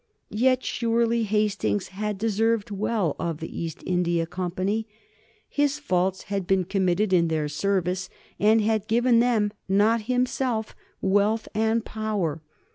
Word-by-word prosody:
Yet 255 +4 +2
surely 230 -1 +1
Hastings 210 -1 0
had 210 +1 -3
deserved 220 0 0
well 200 -5 0
of 165 -2 -2
the 165 - -7
East 165 -2 -5
India 175 -2 +1
Company. 185 +5 -2 0.6
His 290 0 +1
faults 190 -9 0
had 195 -3 -3
been 190 -1 +3
committed 190 +1 +1
in 170 -2 +4
their 155 -2 -1
service 185 +3 -1 0.3
and 215 +2 +4
had 215 -1 0
given 235 +1 +3
them, 225 -4 +2 0.2
not 215 +4 +3
himself, 250 -2 0 0.3
wealth 205 +3 +2
and 220 +1 +1
power. 205 -8 -2
210 Hz, 130 wpm, -25 LUFS, 185-225 Hz, 0.6 s, in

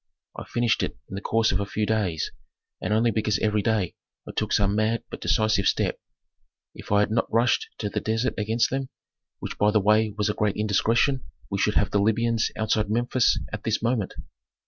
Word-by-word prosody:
I - - -7
finished 120 -1 +1
it - - -3
in - - -9
the 100 - -4
course 115 +1 +2
of 95 - 0
a 100 - -1
few 105 +1 -1
days, 100 -8 -1 0.5
and - - -2
only 115 +2 +3
because 110 -1 0
every 105 -1 +1
day 105 -5 0 0.3
I - - -5
took - - -1
some 100 0 +2
mad 110 +2 +1
but - - -7
decisive 110 -3 +2
step - - 0 0.7
If - - -11
I 100 0 +5
had 105 - 0
not 115 - 0
rushed 120 +2 +2
to 105 - -3
the - - -2
desert 115 +3 -1
against 110 +2 0
them, 135 0 -2 0.5
which - - -7
by 105 - +4
the 105 0 +3
way 105 +2 +3
was 105 - +1
a 105 - 0
great 105 -1 0
indiscretion, 115 +6 +1 0.3
we 100 - -1
should 105 +1 +1
have 100 - +2
the 100 - +2
Libyans 115 +2 +1
outside 110 -1 0
Memphis 120 +2 +2 0.2
at 105 - -5
this 110 -1 -1
moment." 115 -4 0
110 Hz, 205 wpm, -25 LUFS, 105-115 Hz, 0.7 s, I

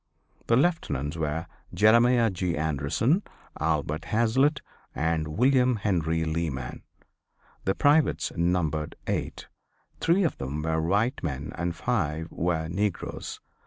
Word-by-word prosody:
The 115 - +4
Lieutenants 115 - 0
were 80 0 -2 0.3
Jeremiah 115 +3 +5
G. 90 -2 -2
Anderson, 80 - +1 0.4
Albert 75 0 -1
Hazlitt 130 +7 +2 0.3
and 80 0 0
William 125 - +3
Henry 85 -6 0
Leeman. 80 -6 -3 0.8
The 95 - +1
privates 150 +2 +3
numbered 85 -3 0
eight. - - -3 0.5
Three 180 +4 +3
of 165 - -1
them 70 +3 -4
were 80 0 0
white 100 +10 +1
men 75 -2 -4
and 85 -1 -2
five 80 +1 -1
were 80 -1 -1
negroes. 95 +3 -3
85 Hz, 115 wpm, -27 LUFS, 80-115 Hz, 0.8 s, Jeremiah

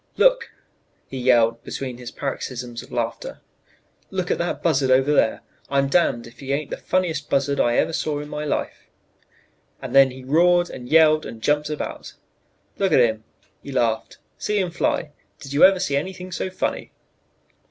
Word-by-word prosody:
"'Look!' - - +3 0.6
he 135 - -7
yelled 115 -2 +3
between 130 -3 -6
his 125 -1 -7
paroxysms 125 -3 -5
of - - -15
laughter, - - -4 0.7
'look 185 -2 -2
at - - 0
that 170 0 -2
buzzard 140 -5 +2
over 135 +3 +4
there! 110 - +2 0.3
I'm 140 0 +1
damned 140 -7 +2
if 115 - -15
he 135 -1 -5
ain't 145 +1 -3
the - - -3
funniest 165 -6 -1
buzzard 140 +1 +1
I 120 0 +2
ever 165 - +1
saw 150 -2 -1
in 150 - -7
my 150 0 -5
life,' 150 - -3 0.9
and - - -7
then 135 -1 +7
he 130 0 -10
roared 175 +5 +3
and 125 -1 -9
yelled 155 -1 +5
and 115 - -8
jumped 150 +5 +1
about. 150 - -5 0.7
'Look 195 -1 +1
at - - +6
him,' 110 -2 +2 0.4
he 140 - -9
laughed; 115 -4 -1 0.2
'see 210 - -1
him 185 -3 0
fly! 165 -2 -1 0.3
did 135 -1 -9
you 145 - +4
ever 190 0 +7
see 140 -4 -1
anything 185 +5 -4
so 185 - -3
funny?' 185 - -3
145 Hz, 175 wpm, -22 LUFS, 130-170 Hz, 0.9 s, then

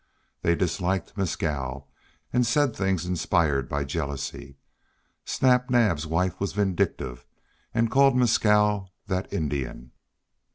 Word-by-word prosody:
They 85 - +2
disliked 90 +1 -1
Mescal, 70 -8 -2 0.5
and 125 0 +3
said 120 +1 +2
things 95 -3 0
inspired 80 -6 +1
by 70 0 -1
jealousy. 70 -1 -5 0.7
Snap 125 -1 +2
Naab's 105 -11 +2
wife 85 +3 0
was 100 - -2
vindictive, 85 -11 -1 0.5
and 115 0 +1
called 135 -1 +5
Mescal 105 -5 +3
"that 95 -1 -3
Indian!" 70 -5 -3
90 Hz, 110 wpm, -26 LUFS, 75-105 Hz, 0.7 s, called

